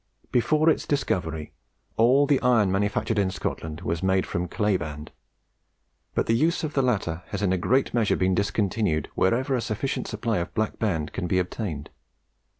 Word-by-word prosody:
Before 155 +6 +2
its 160 - +2
discovery, 80 - -1 0.4
all 130 +5 +5
the 140 -2 +2
iron 115 -6 +3
manufactured 105 +2 0
in 100 -2 +2
Scotland 80 -4 -4
was 85 -2 -2
made 95 0 +2
from 90 +1 -2
clay 105 +2 +1
band; 75 -3 -5 1.0
but - - +1
the 115 - +2
use 160 +10 +2
of 155 -1 -3
the 135 - +2
latter 100 -10 0
has 100 0 -4
in 95 -2 +2
a - - +1
great 130 +9 +1
measure 115 -3 +2
been 95 0 +1
discontinued 100 -4 0
wherever 125 +8 +1
a 125 - 0
sufficient 115 +5 -2
supply 110 -2 -1
of 85 - -5
Black 110 0 -1
Band 85 -9 -1
can 90 - -3
be 90 - +1
obtained. 90 -4 -3
100 Hz, 175 wpm, -25 LUFS, 90-120 Hz, 1.0 s, all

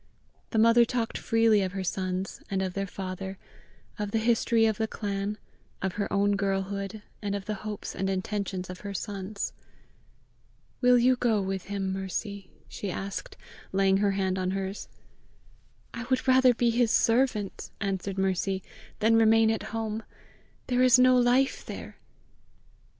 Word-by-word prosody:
The 225 - -2
mother 230 +2 +6
talked 235 -1 -2
freely 225 -2 +3
of 185 -1 -2
her 195 -1 -3
sons, 185 +1 -3
and 190 -1 0
of 185 -1 -3
their 195 +1 -2
father, 190 0 -6 0.6
of 210 -1 -2
the 225 - 0
history 225 0 +3
of 220 -1 +1
the 220 - +1
clan, 205 -1 -3 0.4
of 190 -1 -2
her 205 0 -3
own 200 0 +2
girlhood, 200 +1 -2 0.2
and 200 -1 -2
of 200 -1 -5
the 215 - -2
hopes 210 -1 -5
and 195 0 -1
intentions 190 -1 -2
of 180 0 -8
her 200 -1 -6
sons. 200 +1 -4 1.3
"Will 250 -1 +6
you 250 +2 +4
go 230 -4 +2
with 190 -1 -3
him, 195 -1 -2
Mercy?" 195 +1 -4 0.2
she 205 - -5
asked, 195 +2 -5 0.3
laying 195 0 +3
her 200 0 +2
hand 190 -1 0
on 185 0 0
hers. 195 +1 -4 1.1
"I 235 +1 -5
would 260 +1 0
rather 255 -1 +6
be 235 0 +2
his 235 0 +2
servant," 225 -4 +1
answered 195 -1 -2
Mercy, 190 0 0 0.4
"than 225 +1 +5
remain 225 0 +5
at 220 - -1
home: 220 -1 -3 0.6
there 250 -1 +1
is 255 -1 +7
no 255 0 +6
life 250 +2 +3
there!" - - -8
205 Hz, 155 wpm, -28 LUFS, 195-225 Hz, 1.3 s, is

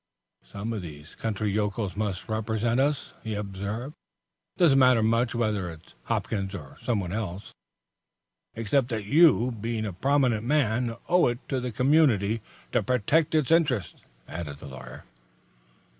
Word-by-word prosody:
"Some 100 - -5
of 110 - -3
these 75 -3 -10
country 105 -2 -2
yokels 105 -1 -1
must 100 -2 -3
represent 110 +2 0
us," 145 +1 0
he 110 -2 -3
observed. 105 +6 -4 0.6
"It - - -28
doesn't 140 -6 +6
matter 125 -4 +5
much 115 +2 +2
whether 105 -6 0
it's 80 -1 -13
Hopkins 100 -2 -2
or 70 -7 -9
someone 100 -7 -1
else." 100 -3 -5 1.0
"Except 115 +3 +1
that 110 -4 -3
you, 145 -2 +5
being 115 0 -3
a 100 - -4
prominent 130 +1 +2
man, 120 -3 +1
owe 180 0 +4
it 120 -1 -1
to 135 - 0
the 125 -1 -3
community 115 -5 +3 0.3
to - - +2
protect 140 +7 +1
its 155 -3 +2
interests," 140 - +1 0.3
added 80 -4 -6
the - - -12
lawyer. 65 -2 -10
110 Hz, 145 wpm, -27 LUFS, 100-125 Hz, 1.0 s, doesn't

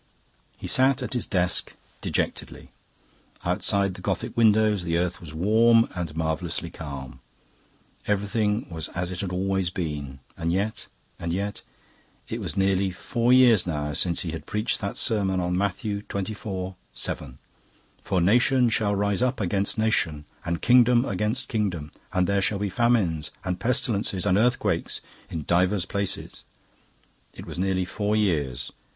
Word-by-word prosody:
He - - -8
sat 130 0 +3
at 125 - -4
his 125 - -1
desk 90 -1 +1 0.3
dejectedly. - - -3 0.7
Outside 100 -1 +1
the - - -10
Gothic - - -2
windows 110 -3 +4
the 85 -1 0
earth 90 +1 -1
was 80 -4 -7
warm 115 +6 +5
and 85 -4 -4
marvellously 80 +1 -2
calm. 65 -5 -8 0.9
Everything 105 +2 0
was 80 -1 -3
as 90 +1 -2
it 90 - -5
had 95 -3 -3
always 95 0 0
been. 75 -6 -4 0.2
And 85 0 -1
yet, 100 +5 -2 0.3
and 85 - -3
yet...It 100 +3 -7
was - - -4
nearly 95 0 +2
four 115 +6 0
years 125 -7 +6
now 75 -3 -2
since 85 +3 +1
he 85 - -3
had 80 - -7
preached 105 +2 0
that 100 -1 -3
sermon 95 -4 +2
on 90 0 0
Matthew 100 +2 -1
xxiv. 95 -2 -4 0.2
7: 65 -2 -3 0.6
"For 95 - 0
nation 120 +7 +4
shall 105 -2 +1
rise 100 +1 +1
up 130 +1 +1
against 100 +1 0
nation, 80 -9 +1 0.2
and 85 -1 -3
kingdom 125 0 +5
against 105 +6 -1
kingdom: 90 -9 -2 0.2
and 90 0 +2
there 100 +1 +1
shall 100 +1 +2
be 100 0 -1
famines, 95 -8 +1 0.2
and 90 -1 -2
pestilences, 115 -5 0
and 95 -2 +3
earthquakes, 105 -6 +1 0.3
in 80 - -4
divers 90 +3 +2
places." 100 0 -3 0.9
It - - -9
was - - -7
nearly 95 -1 +1
four 105 +3 -1
years. 75 - 0
95 Hz, 145 wpm, -25 LUFS, 85-110 Hz, 0.9 s, years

